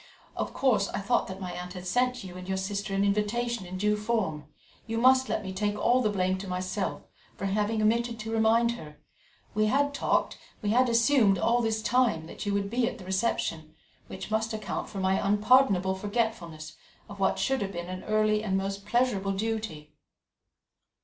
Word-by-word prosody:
Of - - -3
course, 215 -7 +2
I - - -3
thought 205 +5 +1
that 190 0 -7
my 185 -2 -5
aunt 180 0 -6
had 180 -1 -8
sent 250 +5 0
you 180 -2 -9
and 185 0 -8
your 190 0 -1
sister 200 +1 -3
an 195 +1 +2
invitation 210 +1 0
in 185 +1 -6
due 210 +2 +2
form. 210 -9 -1 0.4
You 225 0 -2
must 260 +2 +5
let - - -1
me 190 -1 -5
take 205 +2 -1
all 245 +4 +3
the 215 - +2
blame 185 -2 0
to 195 - -7
myself, 185 +2 -3 0.3
for 195 - -5
having 210 +2 0
omitted 235 +2 +1
to 220 +1 -5
remind 225 +1 +3
her; 150 -11 -9 0.6
we 215 +1 +2
had 285 +5 +2
talked, - - 0 0.2
we 205 - +1
had 250 +2 +4
assumed 230 -3 +4
all 235 +6 +2
this 220 -1 -1
time 235 -11 +2
that 170 - -7
you 200 - +1
would 200 0 0
be 240 0 +1
at - - -4
the 185 - -11
reception, 175 -6 -1 0.3
which 190 +3 -8
must 220 +1 0
account 210 -4 -4
for 205 - -8
my 190 0 +1
unpardonable 205 -2 +4
forgetfulness 190 -7 -3 0.3
of 200 -1 -10
what 195 - +2
should 270 -1 0
have 195 -1 -2
been 175 0 -4
an 185 0 -6
early 215 0 +2
and 190 -3 0
most 195 +1 -4
pleasurable 220 -5 +1
duty." 205 -8 -4
205 Hz, 195 wpm, -28 LUFS, 190-230 Hz, 0.6 s, must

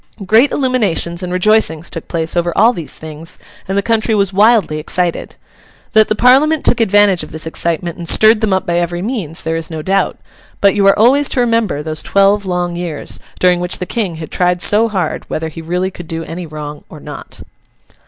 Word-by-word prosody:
Great 225 +8 +4
illuminations 210 - 0
and 180 -1 -4
rejoicings 180 -4 +1
took 165 - -7
place 165 0 -2
over 175 0 0
all 230 +4 +5
these 170 -8 -6
things, 160 +1 -7 0.3
and 195 +1 -2
the 200 - +1
country 225 0 +1
was 200 -2 0
wildly 205 -6 +3
excited. 175 +2 -2 0.6
That 215 -1 +5
the 215 - 0
Parliament 275 +7 +3
took 240 - +2
advantage 205 -3 +3
of 155 - -9
this 160 +1 -3
excitement 170 +1 -2
and 170 -1 -3
stirred 220 0 +5
them 220 -2 0
up 190 0 0
by 170 0 0
every 175 +1 -2
means, 200 - -4
there 160 0 -2
is 165 -1 -3
no 160 -2 -6
doubt; 195 +3 0 0.4
but 200 -1 +4
you 200 -1 +2
are 195 - +5
always 265 +6 +4
to - - -1
remember 230 -10 0
those 155 0 -3
twelve 200 0 +2
long 175 -1 -2
years, 170 -4 -5 0.2
during 180 -1 +3
which 180 0 -1
the 180 - -4
King 195 -5 -3
had 160 -1 -8
tried 180 -1 +1
so 220 +2 +4
hard 190 -4 -2
whether 160 0 -3
he 160 +1 -9
really 180 +3 -2
could 175 -2 -10
do 165 0 -4
any 170 +1 -7
wrong 150 -1 -8
or - - -11
not. - - -10
180 Hz, 205 wpm, -15 LUFS, 165-215 Hz, 0.6 s, all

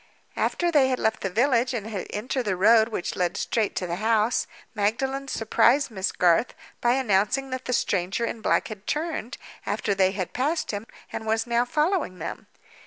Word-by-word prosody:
After 345 -1 0
they 285 -5 +5
had 255 -1 0
left 220 -2 0
the 195 - -1
village, 250 +4 +2
and 215 -3 -3
had 215 -4 -5
entered 245 +4 -2
the 200 -3 0
road 220 +4 +5
which 215 - -3
led 180 -1 0
straight 220 -3 -1
to 185 - -2
the 170 0 -3
house, 220 +2 +1 0.3
Magdalen 265 +6 -1
surprised 245 +3 +2
Miss 190 -2 -1
Garth 175 +5 +2 0.3
by 240 0 +3
announcing 255 +2 +1
that 260 0 -4
the - - -2
stranger 195 +1 0
in 225 -1 -5
black - - +1
had 210 -2 -9
turned, 300 -5 -2 0.3
after 205 0 -1
they 190 -1 +3
had 190 -3 -4
passed 300 +6 0
him, 205 +2 -5 0.3
and 220 - -5
was 225 +1 +1
now 240 0 +1
following 300 - 0
them. - - -6
225 Hz, 185 wpm, -25 LUFS, 205-260 Hz, 0.3 s, they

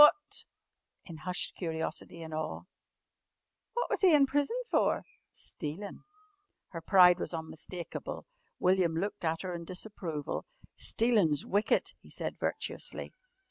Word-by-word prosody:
What 300 0 +6 0.3
" - - -50
in 165 - -7
hushed 180 +4 -2
curiosity 165 0 -4
and 160 -1 -7
awe 155 0 -3 1.1
"what 480 +1 0
was - - -1
he 365 -5 +7
in 280 -2 +7
prison 290 - +1
for?" - - +3 0.3
"Stealin'." 165 +7 -6 0.6
Her 165 - -6
pride 180 0 +7
was - - -2
unmistakable. 165 +2 -6 0.3
William 180 -3 +3
looked 200 +4 -2
at 165 +1 0
her 185 -1 -3
in 170 -1 -4
disapproval. 180 - -4 0.3
"Stealin's 210 - +3
wicked," 205 +2 +2
he - - -17
said - - -3
virtuously. - - -2
180 Hz, 130 wpm, -32 LUFS, 160-210 Hz, 1.1 s, he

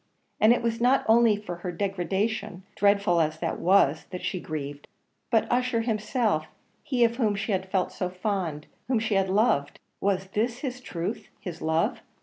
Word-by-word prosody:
And 215 - +6
it 240 0 +2
was 230 0 -1
not 255 +3 +3
only 225 -1 +5
for 180 -5 -6
her 175 +1 -5
own 175 - -7
degradation, 195 0 -2
dreadful 200 -4 +3
as 155 0 0
that 165 0 -3
was, 170 -5 +3
that 180 0 -6
she 185 - -2
grieved, 145 -3 -6 0.4
but 225 - +3
Ussher 245 -1 +1
himself 215 - 0 0.3
he 250 -4 +1
of 235 0 +2
whom 215 -5 +2
she 210 +2 -2
had 190 -1 -1
felt 190 -1 0
so 180 - -3
fond 180 -5 -3 0.2
whom 255 -1 +2
she 220 -1 -1
had 195 -1 +2
so 190 - -2
loved 195 -10 +2 0.2
was 190 -1 0
this 230 +5 -1
his 255 -3 -4
truth, 185 0 -4
his 180 -5 -7
love? 160 +1 0
200 Hz, 185 wpm, -27 LUFS, 175-225 Hz, 0.4 s, And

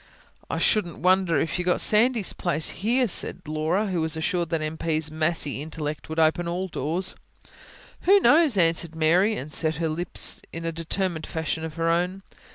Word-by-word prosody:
"I - - -2
shouldn't 190 -7 +1
wonder 185 -4 +2
if 160 +4 -2
you 180 - -2
got 180 - +2
Sandy's 225 -1 +2
place 160 -3 -1
here," 245 +5 0
said 190 - 0
Laura, 155 +7 0
who 185 -5 -2
was 160 0 +2
assured 170 +1 -1
that 165 - -1
M. 155 +1 -4
P.'s 155 -1 -2
massy 155 -3 -1
intellect 155 0 -5
would 160 - -5
open 165 +2 +2
all 180 +2 -2
doors. 170 +3 -2 1.0
"Who 400 +1 +8
knows?" 310 - +4
answered 165 -1 +1
Mary, 175 +7 +3
and 150 -2 -7
set 155 -1 +1
her 165 +1 -2
lips 170 +2 0
in 165 0 -6
a 165 - -1
determined 165 0 -3
fashion 160 0 -3
of 160 -1 -6
her 165 0 0
own. 180 +3 -1
165 Hz, 180 wpm, -25 LUFS, 160-185 Hz, 1.0 s, Who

